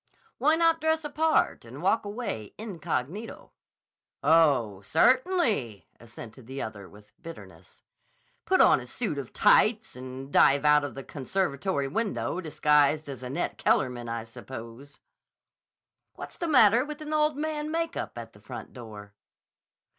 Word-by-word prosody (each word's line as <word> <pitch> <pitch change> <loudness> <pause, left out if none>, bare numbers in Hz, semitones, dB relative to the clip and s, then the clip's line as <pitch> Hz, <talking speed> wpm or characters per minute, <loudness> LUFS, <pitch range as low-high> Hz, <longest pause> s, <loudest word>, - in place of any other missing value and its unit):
"Why 305 +6 +4
not 330 0 +2
dress 320 0 +1
a 295 - -5
part 315 +1 +1
and - - -11
walk - - +2
away 205 - -5
incognito?" 195 - -5 0.7
"Oh, 140 -12 +3
certainly!" 230 - +1
assented 115 +1 -12
the 135 +1 -6
other 100 -5 -7
with 105 +1 -18
bitterness. 165 -1 -13 0.6
"Put 375 - +3
on - - +6
a - - -9
suit 200 -12 -3
of 130 - -7
tights 220 0 +3
and 130 +2 -9
dive 140 +1 +5
out 150 0 +5
of 145 -5 -5
the 135 - -7
conservatory 145 0 -2
window 195 +1 -2
disguised 150 -2 +2
as 135 -2 -7
Annette 130 +1 -4
Kellerman, 120 -3 0
I 115 -1 -3
suppose." 115 +4 -11 1.2
"What's - - -9
the 340 - -3
matter 245 -5 +5
with 300 +1 -7
an 305 0 -5
old 300 -1 +2
man 305 0 -3
makeup 330 +1 -3
and - - -8
the - - -18
front - - -9
door?" 105 -5 -11
150 Hz, 140 wpm, -27 LUFS, -, 1.2 s, on